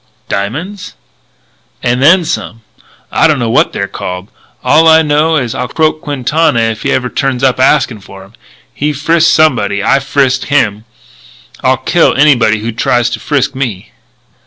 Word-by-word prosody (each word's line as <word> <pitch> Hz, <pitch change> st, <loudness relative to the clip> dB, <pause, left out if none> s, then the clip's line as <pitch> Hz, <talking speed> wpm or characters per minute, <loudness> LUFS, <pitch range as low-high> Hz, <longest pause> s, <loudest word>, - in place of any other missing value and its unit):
"Diamonds?" 155 Hz, -, -5 dB, 0.9 s
"And 125 Hz, +1 st, 0 dB
then 170 Hz, +5 st, +4 dB
some. 115 Hz, -8 st, -4 dB, 0.5 s
I -, -, +3 dB
dunno 130 Hz, -7 st, 0 dB
what -, -, +2 dB
they're 100 Hz, -, -3 dB
called. 90 Hz, +1 st, -7 dB, 0.3 s
All 160 Hz, +1 st, +4 dB
I 160 Hz, 0 st, +6 dB
know 155 Hz, +2 st, +1 dB
is 125 Hz, -6 st, -1 dB
I'll 125 Hz, -, -3 dB
croak 155 Hz, +1 st, -1 dB
Quintana 145 Hz, -1 st, 0 dB
if 115 Hz, -2 st, -1 dB
he -, -, -1 dB
even 125 Hz, -2 st, -1 dB
turns 135 Hz, 0 st, -2 dB
up 130 Hz, -1 st, +2 dB
askin' 130 Hz, -4 st, +2 dB
for 95 Hz, 0 st, -13 dB
'em. 100 Hz, +3 st, -19 dB, 0.4 s
He 150 Hz, +1 st, -2 dB
frisked 165 Hz, +4 st, +2 dB
somebody. 120 Hz, -12 st, +1 dB
I 135 Hz, +5 st, +3 dB
frisked 135 Hz, -1 st, 0 dB
him. 110 Hz, -7 st, 0 dB, 0.8 s
I'll -, -, +2 dB
kill -, -, +1 dB
anybody 125 Hz, -7 st, +3 dB
who 115 Hz, +2 st, -3 dB
tries 120 Hz, +1 st, 0 dB
to -, -, -4 dB
frisk 145 Hz, -4 st, -1 dB
me." 120 Hz, -8 st, -5 dB
130 Hz, 160 wpm, -11 LUFS, 115-150 Hz, 0.9 s, I